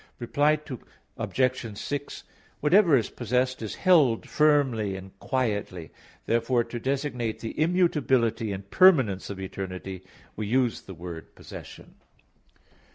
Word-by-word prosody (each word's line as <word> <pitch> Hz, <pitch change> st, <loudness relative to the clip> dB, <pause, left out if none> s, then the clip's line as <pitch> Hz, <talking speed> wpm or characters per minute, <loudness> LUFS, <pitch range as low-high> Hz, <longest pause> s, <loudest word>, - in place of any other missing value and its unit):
Reply 145 Hz, +5 st, +2 dB, 0.6 s
Obj. 125 Hz, -5 st, -1 dB
6: 145 Hz, +4 st, -5 dB, 0.4 s
Whatever 170 Hz, -1 st, +5 dB
is 115 Hz, -, -2 dB
possessed, 125 Hz, +2 st, -1 dB
is 110 Hz, -, -5 dB
held 155 Hz, -, +3 dB
firmly 135 Hz, -10 st, +2 dB
and 95 Hz, 0 st, -9 dB
quietly; 105 Hz, -, -2 dB, 0.3 s
therefore 120 Hz, +1 st, +1 dB
to 120 Hz, -, -6 dB
designate 130 Hz, -3 st, -2 dB
the 115 Hz, -, -5 dB
immutability 135 Hz, -, +2 dB
and 100 Hz, 0 st, -6 dB
permanence 135 Hz, -, +4 dB
of 100 Hz, -1 st, -6 dB
eternity, 95 Hz, -1 st, -6 dB, 0.3 s
we 105 Hz, -1 st, -4 dB
use 125 Hz, 0 st, +1 dB
the 95 Hz, -, -11 dB
word 85 Hz, -1 st, -9 dB
"possession." -, -, -11 dB
120 Hz, 115 wpm, -26 LUFS, 100-140 Hz, 0.6 s, Whatever